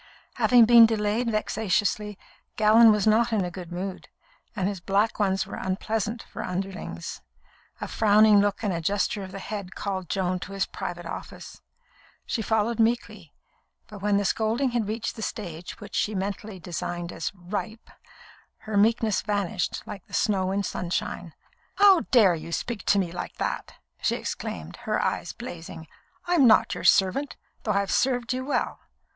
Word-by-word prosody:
Having 245 -2 +6
been 230 0 +8
delayed 220 +2 0
vexatiously, 210 -1 0 0.4
Gallon 220 +1 +7
was 210 -2 +1
not 225 +2 +3
in 210 -4 +1
a 175 - -5
good 175 -1 -9
mood, 185 +2 -5 0.5
and 190 -3 0
his 200 -2 -3
black 200 +6 0
ones 195 -2 +1
were - - -7
unpleasant 220 +4 -2
for - - -8
underlings. 190 +2 -5 0.6
A - - -4
frowning 215 -1 +5
look 205 +2 0
and 205 -3 0
a 170 - -2
gesture 200 +3 0
of 190 -1 -7
the 195 - -7
head 195 -1 -6
called 190 -3 -4
Joan 185 -2 0
to 195 - -8
his 195 -1 0
private - - -6
office. - - -8 0.6
She 230 - -2
followed 220 +1 0
meekly; 230 +2 0 0.5
but 210 -3 -11
when 205 0 +2
the 200 - 0
scolding 230 +6 +1
had 235 -3 -1
reached 220 +2 -3
the - - -6
stage 175 -6 -6
which 205 - -11
she 210 - 0
mentally 200 +1 -4
designated 175 0 -5
as - - -2
"ripe," 210 +5 -6 0.7
her 215 -1 -3
meekness 220 0 +3
vanished 200 -4 -2
like 195 -3 -9
snow 190 -3 +1
in 200 +1 0
sunshine. 180 -2 -3 0.4
"How 395 -3 +7
dare 215 -8 +6
you 165 0 -6
speak 220 +3 -3
to 200 - +4
me 185 -4 0
like 175 - -6
that!" - - -4 0.3
she - - +1
exclaimed, - - -5
her - - +1
eyes - - -1
blazing. 175 -7 -9 0.4
"I'm 345 -7 +4
not 220 - +5
your - - -6
servant, 200 +10 +3 0.2
though 210 - -1
I 200 - +2
have 200 - -3
served 245 +3 +1
you 255 +1 -3
well. 280 - -1
205 Hz, 165 wpm, -26 LUFS, 190-225 Hz, 0.7 s, been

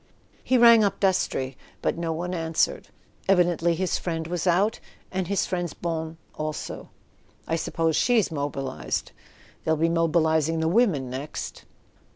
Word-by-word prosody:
He 255 - +3
rang 235 -2 +8
up 200 - 0
Dastrey, 155 -9 0 0.3
but - - +1
no 170 -1 -2
one 175 +3 -3
answered. 165 -2 0 0.4
Evidently 175 -2 +3
his 185 +1 -1
friend 165 -2 -3
was 175 +2 -2
out, 190 +5 +2 0.3
and 185 -2 -2
his 200 +1 +1
friend's 175 -3 -3
bonne 160 -1 -4 0.2
also. 155 0 -5 0.6
"I 165 - 0
sup¬ 165 - -4
pose 165 -1 +2
she's 230 -4 +3
mobilised: 140 -2 -3 0.5
they'll 160 0 +1
be 165 +2 +2
mobilising 165 -1 +2
the 160 - +1
women 165 - +2
next." 135 +4 -6
165 Hz, 145 wpm, -25 LUFS, 160-185 Hz, 0.6 s, rang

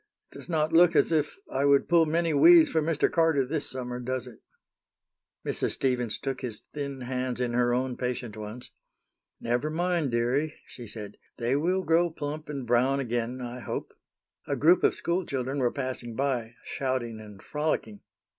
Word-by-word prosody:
It - - -12
does - - -12
not 160 -1 0
look 170 0 +6
as - - +4
if 150 -2 0 0.2
I 135 - +1
would 140 -1 +4
pull 170 -2 +4
many 165 +1 +1
weeds 330 - +7
for 160 - +2
Mr. 155 -1 +2
Carter 165 -5 +2
this 150 +3 0
summer, 125 -1 -4
does 130 0 -3
it?" 120 -4 -12 1.1
Mrs. - - -1
Stevens 125 -4 0
took 135 -2 -4
his 115 -4 -5
thin 140 -2 -4
hands 125 0 -3
in 125 -1 -1
her 120 0 +2
own 125 +1 0
patient 125 -3 -3
ones. 110 +3 -8 0.7
"Never 120 +6 -1
mind, 170 -2 0
dearie," 125 +6 0
she 120 - -10
said, 105 -1 -8 0.2
"they 120 +2 0
will 180 +6 +1
grow 170 +1 +3
plump 150 -1 -6
and 140 -4 -4
brown 125 +4 +2
again, 120 0 -2
I 125 0 -6
hope." - - -5 0.5
A - - 0
group 170 +4 +4
of - - +4
school 175 +2 -1
children 135 -1 -3
were 125 -2 +2
passing 130 -4 -4
by, 125 -4 -1
shouting 130 -4 -3
and 105 -2 -12
frolicking. 150 -9 -2
130 Hz, 175 wpm, -28 LUFS, 120-155 Hz, 1.1 s, weeds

